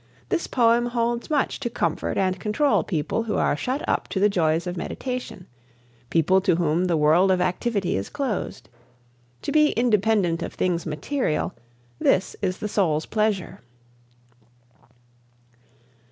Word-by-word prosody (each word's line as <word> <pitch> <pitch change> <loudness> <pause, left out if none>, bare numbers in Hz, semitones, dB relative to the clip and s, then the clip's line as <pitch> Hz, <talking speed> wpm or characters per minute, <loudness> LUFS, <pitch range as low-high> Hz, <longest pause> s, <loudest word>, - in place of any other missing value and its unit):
This 360 -4 -1
poem 240 -1 +3
holds 240 +1 -1
much 295 -3 0
to 240 - -2
comfort 235 - -2
and 185 -1 0
control 270 +9 +1
people 165 +4 -1
who 215 - -2
are - - +2
shut 255 - -3
up - - 0
to 190 - -3
the 205 +2 +4
joys 165 -3 +1
of 180 0 -4
meditation 250 0 -5 0.6
people 180 +4 +3
to 180 - +2
whom 170 +1 +1
the 170 -3 +1
world 160 +5 +4
of 185 -1 +3
activity 190 +2 0
is 95 - -3
closed. 210 - -3 0.8
To - - -2
be 305 -1 +4
independent 210 -7 +2
of - - -5
things 175 -2 -1
material 155 - -1 0.5
this 185 0 +2
is 185 -2 -1
the 210 - -4
soul's 165 -7 +1
pleasure. 215 -4 -1
190 Hz, 140 wpm, -24 LUFS, 170-235 Hz, 0.8 s, the